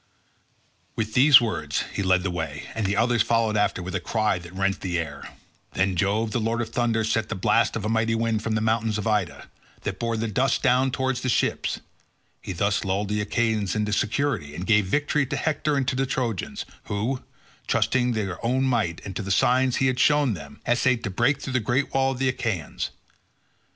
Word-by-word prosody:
With 110 Hz, 0 st, -2 dB
these 135 Hz, +3 st, +8 dB
words 115 Hz, -3 st, -2 dB
he -, -, -2 dB
led 95 Hz, -1 st, +2 dB
the 95 Hz, -, -1 dB
way, 80 Hz, -4 st, -4 dB
and 110 Hz, -3 st, -1 dB
the 100 Hz, -, 0 dB
others 120 Hz, +1 st, +3 dB
followed 115 Hz, -2 st, +1 dB
after 105 Hz, -3 st, +1 dB
with 90 Hz, +1 st, -6 dB
a 95 Hz, -, 0 dB
cry 105 Hz, +2 st, 0 dB
that 85 Hz, 0 st, -11 dB
rent 95 Hz, +1 st, -1 dB
the 90 Hz, -2 st, -1 dB
air. 85 Hz, -1 st, -5 dB, 0.4 s
Then 95 Hz, -1 st, +1 dB
Jove 105 Hz, +5 st, 0 dB
the 120 Hz, -, 0 dB
lord 115 Hz, +1 st, -1 dB
of 115 Hz, -2 st, -2 dB
thunder 115 Hz, -2 st, +1 dB
sent 110 Hz, 0 st, 0 dB
the 115 Hz, -, -2 dB
blast 115 Hz, +4 st, +2 dB
of 110 Hz, -3 st, -3 dB
a -, -, 0 dB
mighty 115 Hz, +1 st, +1 dB
wind 115 Hz, -1 st, 0 dB
from 110 Hz, 0 st, -1 dB
the 110 Hz, -, 0 dB
mountains 110 Hz, -1 st, +1 dB
of 105 Hz, -, -4 dB
Ida, 105 Hz, -5 st, -1 dB, 0.3 s
that -, -, -4 dB
bore 115 Hz, -1 st, -1 dB
the 115 Hz, +1 st, -1 dB
dust 125 Hz, +4 st, +1 dB
down 130 Hz, +1 st, +3 dB
towards 130 Hz, 0 st, -1 dB
the 130 Hz, -, -1 dB
ships; -, -, 0 dB, 0.6 s
he -, -, -6 dB
thus 100 Hz, +3 st, 0 dB
lulled 100 Hz, +1 st, -1 dB
the 105 Hz, 0 st, 0 dB
Achaeans 110 Hz, -2 st, 0 dB
into 105 Hz, -1 st, 0 dB
security, 105 Hz, -, -1 dB
and 90 Hz, -, -5 dB
gave 105 Hz, -2 st, +3 dB
victory 145 Hz, +4 st, +1 dB
to 145 Hz, -, -3 dB
Hector 150 Hz, -1 st, 0 dB
and 135 Hz, -2 st, 0 dB
to 130 Hz, -, 0 dB
the 135 Hz, +1 st, 0 dB
Trojans, 120 Hz, -7 st, -3 dB, 0.2 s
who, 115 Hz, +6 st, -2 dB, 0.5 s
trusting 125 Hz, -1 st, +2 dB
to 110 Hz, -2 st, 0 dB
their 95 Hz, +2 st, -6 dB
own 130 Hz, +3 st, +1 dB
might 115 Hz, -10 st, 0 dB
and 95 Hz, -, -6 dB
to -, -, -2 dB
the 100 Hz, -, -6 dB
signs 125 Hz, +5 st, +3 dB
he 135 Hz, -, +1 dB
had 130 Hz, -1 st, +1 dB
shown 145 Hz, -3 st, +4 dB
them, 70 Hz, -5 st, -10 dB
essayed 120 Hz, 0 st, +2 dB
to 100 Hz, -, -3 dB
break 120 Hz, +8 st, +2 dB
through 130 Hz, -, -5 dB
the 130 Hz, -, +3 dB
great 125 Hz, +5 st, -1 dB
wall 135 Hz, 0 st, +2 dB
of -, -, -8 dB
the 135 Hz, +1 st, 0 dB
Achaeans. 110 Hz, -, -3 dB
110 Hz, 215 wpm, -25 LUFS, 100-125 Hz, 0.6 s, these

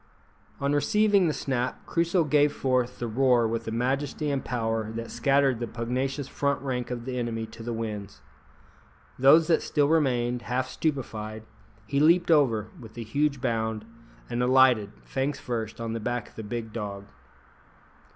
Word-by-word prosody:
On 140 Hz, +1 st, 0 dB
receiving 200 Hz, +5 st, +3 dB
the -, -, +2 dB
snap, 130 Hz, -2 st, -2 dB
Crusoe 170 Hz, +1 st, +1 dB
gave 150 Hz, -1 st, +3 dB
forth 130 Hz, -3 st, 0 dB
the 120 Hz, -, -3 dB
roar 120 Hz, 0 st, +3 dB
with 115 Hz, 0 st, -3 dB
a -, -, -2 dB
majesty 135 Hz, +5 st, -1 dB
and 140 Hz, -1 st, -1 dB
power 115 Hz, -2 st, -2 dB
that 115 Hz, 0 st, -5 dB
scattered 135 Hz, -3 st, +2 dB
the 120 Hz, -, -3 dB
pugnacious 130 Hz, +4 st, -2 dB
front 140 Hz, 0 st, -1 dB
rank 125 Hz, -3 st, -2 dB
of 120 Hz, -1 st, -5 dB
the 130 Hz, -1 st, -3 dB
enemy 115 Hz, -2 st, -2 dB
to 115 Hz, -, -12 dB
the 120 Hz, +1 st, -4 dB
winds. 105 Hz, -5 st, -5 dB, 1.0 s
Those 145 Hz, +5 st, +7 dB
that 165 Hz, -, +3 dB
still 145 Hz, -2 st, +1 dB
remained, 125 Hz, -6 st, +1 dB
half 130 Hz, +2 st, -2 dB
stupified, 110 Hz, -8 st, -3 dB, 0.4 s
he 140 Hz, +6 st, 0 dB
leaped 170 Hz, +3 st, +4 dB
over 115 Hz, -9 st, +3 dB
with 115 Hz, -2 st, -12 dB
a 115 Hz, -, -4 dB
huge 140 Hz, +4 st, 0 dB
bound, 110 Hz, -3 st, -1 dB, 0.4 s
and 120 Hz, 0 st, -2 dB
alighted, 125 Hz, -5 st, +4 dB
fangs 135 Hz, +2 st, -2 dB
first, 115 Hz, -3 st, -4 dB
on 115 Hz, -1 st, -3 dB
the 115 Hz, -, -3 dB
back 120 Hz, 0 st, -3 dB
of -, -, -24 dB
the -, -, -6 dB
big 110 Hz, +1 st, -5 dB
dog. 100 Hz, -3 st, -5 dB
125 Hz, 165 wpm, -27 LUFS, 115-140 Hz, 1.0 s, Those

